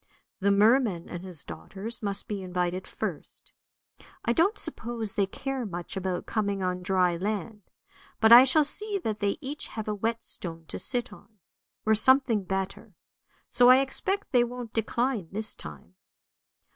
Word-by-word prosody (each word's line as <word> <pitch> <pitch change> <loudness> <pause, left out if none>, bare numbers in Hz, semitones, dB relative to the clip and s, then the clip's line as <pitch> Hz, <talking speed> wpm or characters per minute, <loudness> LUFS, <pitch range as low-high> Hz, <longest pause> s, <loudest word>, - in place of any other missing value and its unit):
The 200 0 +2
merman 210 -3 +3
and 175 0 -7
his 175 -6 -4
daughters 190 - -3
must 200 -2 -3
be 205 -2 -4
invited 180 0 -2
first. - - -6 0.7
I 235 - +2
don't 360 - +2
suppose 225 -3 -4
they 200 -1 +1
care 270 +5 -4
much 175 -4 -6
about 185 -2 -3
coming 200 -3 -1
on 180 0 -2
dry 180 -1 +2
land, 210 +2 -3 0.6
but 220 0 +5
I 240 +2 +12
shall 285 +4 +4
see 415 +8 -1
that 215 -1 -2
they 200 -1 0
each 290 +2 -4
have 220 -1 -6
a 210 - 0
wet 225 +3 -2
stone 165 -2 -6
to - - -5
sit 245 -3 -2
on, 215 +1 -18 0.5
or 220 - +4
something 230 -2 +5
better; 195 +2 -4 0.5
so 245 -1 +5
I 255 - +9
expect 380 +9 -1
they 245 -3 +5
won't 240 -1 -6
decline 230 -2 -1
this 215 +2 -2
time. 75 +3 -10
215 Hz, 160 wpm, -27 LUFS, 190-245 Hz, 0.7 s, I